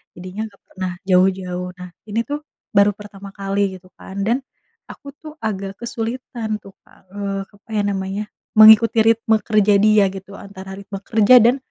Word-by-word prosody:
jadinya 185 +5 -6
nggak 200 -2 -21
pernah 185 -1 -4
jauh-jauh. 185 -1 +1
Nah 180 0 -8 0.2
ini 230 +3 0
tuh 290 +3 -4 0.3
baru 200 -1 +4
pertama 200 -1 -11
kali 195 -1 -1
gitu 185 0 -16
kan, 195 +1 -6
dan 235 +5 +1 0.5
aku 280 - -11
tuh 310 -1 -11
agak 195 -2 -3
kesulitan 230 -1 -4
tuh 195 - -12 0.2
Kak, 185 - -24
eee, 200 -1 -4
apa 205 +2 -26
ya 205 - +1
namanya, 195 +1 -2 0.3
mengikuti 220 +1 +7
ritme 225 -1 +3
kerja 210 -1 +3
dia 215 -1 +5
gitu, 195 +1 -10
antara 190 -1 -10
ritme 195 0 -8
kerja 225 +3 +5
dan 240 +4 +4
200 Hz, 165 wpm, -20 LUFS, 195-220 Hz, 0.5 s, mengikuti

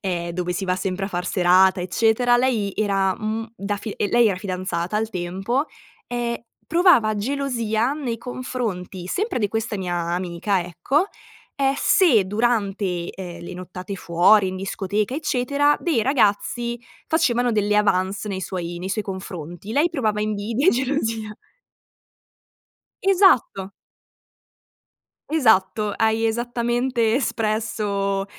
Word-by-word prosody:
ehm, 175 -3 -2
dove 180 0 -2
si 190 +2 -3
va 180 0 0
sempre 195 0 -2
a - - -6
far 180 -1 -3
serata, 185 0 +4
eccetera. 225 +6 +2
Lei 230 -6 +1
era, 195 -2 +1
mhmm, 220 0 -3
da 200 +1 -2
fi 210 +1 -6
ehm, 205 - 0
lei 240 -2 +5
era 190 - -1
fidanzata 185 0 -3
al 220 +1 -1
tempo 195 - -2 0.4
e 240 -1 -3 0.2
provava 310 - +4
gelosia 235 -1 -1
nei 255 -6 -3
confronti 225 -8 -5
sempre 410 - -1
di 205 - +1
questa 225 -1 -2
mia 180 -2 -2
amica, 175 +2 -1
ecco, 180 - 0 0.5
ehm, 275 0 +2
se 265 - +4
durante, 200 -5 0
ehm, 175 -2 -8
le 180 - -7
nottate 185 +2 -7
fuori 185 +4 +4
in 185 - -5
discoteca, 200 +4 -2
eccetera, 290 0 +1
dei 310 -11 +1
ragazzi 235 -1 +1 0.3
facevano 245 -6 +2
delle 210 -2 +1
avance 200 0 +1
nei 190 -1 -3
suoi 175 -2 -4
nei 185 - -5
suoi 210 +2 -1
confronti, 185 0 -7
lei 315 +6 +2
provava 215 -9 -1
invidia 215 - 0
e - - +9
gelosia. 225 -5 -1 1.7
Esatto! 370 - +3 1.6
Esatto. 220 -7 +2
Hai 220 0 +2
esattamente 240 0 0
espresso, 210 -5 -1
210 Hz, 130 wpm, -22 LUFS, 190-240 Hz, 1.7 s, e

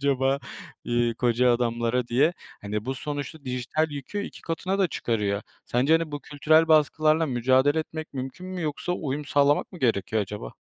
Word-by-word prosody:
acaba, 135 -1 +2 0.5
iii, 120 -1 +1
koca 125 0 +3
adamlara?" 120 0 0
diye. 140 +8 +3 0.3
Hani, 105 +1 -3
bu 130 +2 -2
sonuçta 145 +2 -5
dijital 130 +5 -1
yükü 145 +9 -5
2 - - -8
katına 185 +4 -2
da 190 -2 +3
çıkarıyor. 105 -7 -1 0.2
Sence, 130 +6 +1
hani, 165 -2 +2
bu 145 - -4
kültürel 155 +3 +3
baskılarla 155 +1 +4
mücadele 130 +4 +3
etmek 155 0 -5
mümkün 135 +7 -6
mü? 185 -1 -5
Yoksa 155 +3 -2
uyum 150 -4 -3
sağlamak 145 +4 +2
mı 180 - -9
gerekiyor 110 - +1
acaba? 100 -10 -7
140 Hz, 165 wpm, -26 LUFS, 120-155 Hz, 0.5 s, baskılarla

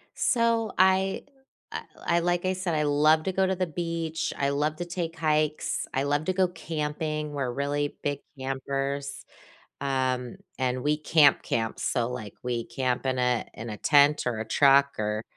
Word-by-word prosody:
So, 230 -2 +2
I 190 +1 +3 0.5
I - - -4 0.2
I 170 0 +3
like 175 +1 0
I 185 - +2
said, 185 -3 -2
I 150 - +1
love 150 +2 +4
to 190 - -1
go 190 +1 +2
to 190 - 0
the 185 0 0
beach, 165 -1 -3
I 140 - +1
love 150 +2 0
to 175 - -4
take 170 -2 -4
hikes, 155 -1 0
I 135 - +1
love 145 +2 0
to 185 - +1
go 185 0 +3
camping. 155 -2 -3
We're 135 -4 -2
really 145 +2 -2
big 145 -1 -1 0.2
campers, 135 +1 -3 0.5
um, 130 -3 -1 0.2
and 130 -1 -1
we 150 +1 +2
camp, 150 -1 +4
camp. 115 -1 -2
So, 120 -2 0
like, 115 -5 -6
we 120 -2 -2
camp 130 -1 -2
in 130 -1 0
a 125 -1 +1
in 115 - -7
a 105 - -5
tent 145 +3 +4
or 120 -3 -1
a 110 - -3
truck 140 +2 +5
or, 105 +1 -1
145 Hz, 180 wpm, -27 LUFS, 130-165 Hz, 0.5 s, truck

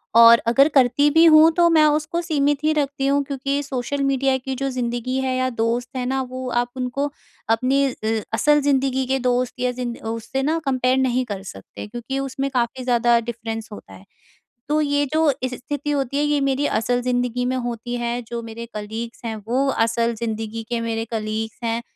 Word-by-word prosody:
और 230 0 +9
अगर 275 +5 +5
करती 270 +2 +4
भी 325 +2 +6
हूँ, 315 0 +7
तो 340 +1 +3
मैं 310 -2 +5
उसको 305 +3 +1
सीमित 290 -3 0
ही 310 - +3
रखती 280 -2 -1
हूँ, 280 0 +2
क्योंकि 275 +1 -2
सोशल 275 0 -3
मीडिया 270 -1 +2
की 265 +1 -5
जो 275 - 0
ज़िंदगी 250 0 -2
है 260 -1 -1
या 255 0 +1
दोस्त 235 +1 -1
है 250 - -2
ना, 265 +1 0
वो 255 0 -6
आप 240 0 0
उनको 275 +3 -2 0.4
अपनी 265 +4 +1 0.2
अ 220 -1 0
असल 295 +4 +3
ज़िंदगी 265 -2 +1
के 265 0 +1
दोस्त 250 0 0
या 250 0 +1
जिंद 245 -1 -5 0.2
उससे 230 +4 -3
ना 320 +3 +1
कंपेयर 255 -1 +1
नहीं 255 -1 +1
कर 200 -4 -6
सकते। 95 - -10
क्योंकि 240 +4 -5
उसमें 275 0 -3
काफ़ी 250 +1 -1
ज़्यादा 240 -1 +3
डिफरेंस 225 -1 -5
होता 95 - -11
है। 95 +1 -14 0.6
तो 305 +1 +2
ये 285 0 +1
जो 315 -1 +3
इस 255 -1 -2
स्थिति 290 +4 -4
होती 280 -1 -1
है 290 - +2
ये 295 -1 +1
मेरी 275 +2 +1
असल 245 +2 0
ज़िंदगी 245 0 -1
में - - -1
होती 240 -1 -4
है। 240 0 -2
जो 235 +1 -6
मेरे 230 +1 -8
कलीग्स 220 +3 -6
हैं 220 -1 -3
वो 260 +4 +1 0.2
असल 230 +1 0
ज़िंदगी 225 0 -4
के 235 -1 -1
मेरे 225 -1 -2
कलीग्स 220 0 -3
हैं, 230 +1 -1
255 Hz, 195 wpm, -22 LUFS, 235-275 Hz, 0.6 s, और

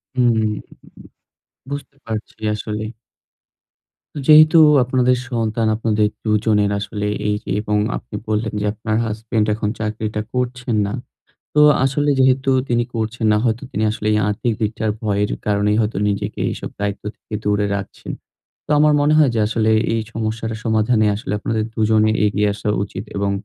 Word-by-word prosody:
হুম, 120 -3 +3 1.2
বুঝতে 140 -1 -6
পারছি 110 -1 -6
আসলে। 105 0 -4 1.4
যেহেতু 155 +1 +8 0.2
আপনাদের 125 0 +2
সন্তান 115 -2 0
আপনাদের 110 -1 +1 0.2
২ 110 - 0
জনের 105 -2 +3
আসলে 105 0 -3 0.2
এই 105 - +1
যে - - -10
এবং 105 -1 0 0.2
আপনি 115 - -10
বললেন 110 +1 -1
যে - - -1
আপনার 110 0 -2
হাসব্যান্ড 110 0 -1
এখন 105 -1 -2
চাকরিটা 105 0 -3
করছেন 125 -1 -2
না। 100 - -3 0.6
তো 150 - +4 0.2
আসলে 145 +2 +1
যেহেতু 130 +1 +3 0.2
তিনি 120 0 +1
করছেন 110 0 -2
না, 105 - +3
হয়তো 115 0 0
তিনি 105 - -1
আসলে 105 0 -4
এই 105 - +3
আর্থিক 105 +3 -1
দিকটার 110 0 -1
ভয়ের 105 -1 0 0.2
কারণেই 105 0 +2
হয়তো 105 -2 -1
নিজেকে 100 0 -3
এইসব - - -6
দায়িত্ব 100 0 -3
থেকে 110 - -10
দূরে 105 0 +1
রাখছেন। 100 -1 -7 0.5
তো - - -11
আমার 150 0 +5
মনে 145 +1 +3
হয় 150 -4 +5
যে 110 - +1
আসলে 110 0 +1 0.2
এই 115 - +1
সমস্যাটার 115 0 -3
সমাধানে 110 0 +2
আসলে 110 0 -5
আপনাদের 110 +1 -1
২জনে 110 0 +3
এগিয়ে 105 0 +2
আসা 105 - -5 0.2
উচিত 95 0 -7
এবং 100 0 0
110 Hz, 155 wpm, -20 LUFS, 105-120 Hz, 1.4 s, যেহেতু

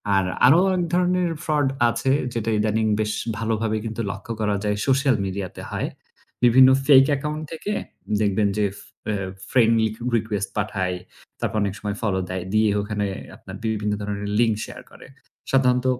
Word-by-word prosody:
আর 95 -1 +3 0.2
আরও 140 +7 +7 0.2
এক 180 - +1
ধরনের 180 -1 +2
fraud 150 -3 +2 0.2
আছে 130 +3 0 0.2
যেটা 115 -1 -2
ইদানিং 110 +1 +1
বেশ 105 0 0 0.2
ভালোভাবে 115 -1 -1
কিন্তু 110 +1 -3
লক্ষ্য 100 +4 -8
করা 105 -1 +1
যায় 105 0 0
social 135 -1 +3
media 95 0 -3
তে - - -8
হয়। - - -2 0.6
বিভিন্ন 130 +2 +7 0.2
fake 135 -2 +7
account 150 +2 -4
থেকে 165 +6 -4 0.5
দেখবেন 105 0 +2
যে 105 - +2
এফ 100 - -13 0.7
friend 115 -3 +4 0.4
request 105 -3 -1
পাঠায়, 90 -2 -1 0.4
তারপর - - -2
অনেক 100 - -1
সময় 105 0 -3
follow 95 -4 0
দেয়। 95 -1 -3
দিয়ে 110 0 +4
ওখানে 105 0 -2 0.3
আপনার - - -10
বিভিন্ন 105 -1 -1
ধরনের 100 0 -4
link 115 -2 +3
share - - -10
করে। - - -14 0.4
সাধারণত 125 -1 +3
110 Hz, 160 wpm, -23 LUFS, 105-130 Hz, 0.7 s, আরও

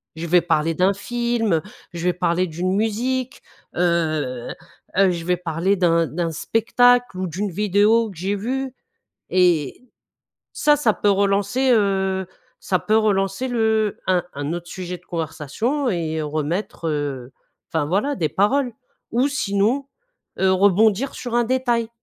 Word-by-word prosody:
Je 160 +1 -5
vais 175 +2 +4
parler 165 -1 +1
d'un 185 +4 +2
film, 225 -4 -1 0.3
je 170 0 -5
vais 180 - +2
parler 180 +1 0
d'une 180 +3 -2
musique, 250 +5 -1 0.3
heu 155 -8 0 0.5
heu, 195 -1 +5
je 170 -1 -4
vais 180 +1 +2
parler 175 +2 0
d'un 170 -3 +2
d'un 165 +4 -2
spectacle 245 +4 +2
ou 185 - -2
d'une 190 +5 -3
vidéo 210 +4 +2
que 195 - -12
j'ai 195 +4 -1
vue 260 +5 -3 0.6
et 175 - +2 0.7
ça, 295 0 +3
ça 240 -7 +2
peut 205 - +1
relancer, 200 +6 +1
heu, 190 -3 +1 0.3
ça 185 - 0
peut 215 +3 +1
relancer 205 +2 +1
le 220 -3 +1
un 185 -2 +2
un 145 +2 -3
autre 175 0 -5
sujet 180 0 -6
de 180 - -29
conversation 170 - -2
et 160 -4 -2
remettre, 155 +4 -3
heu, 140 -4 -3 0.4
enfin, 160 -2 +1
voilà 205 - 0
des 160 - -1
paroles. 245 - +1 0.4
Ou 245 +3 +2
sinon, 255 -1 0 0.5
heu, 190 0 +3
rebondir 205 +6 +3
sur 245 -2 -5
un 240 - +4
détail. 240 -2 0
195 Hz, 145 wpm, -22 LUFS, 170-225 Hz, 0.7 s, heu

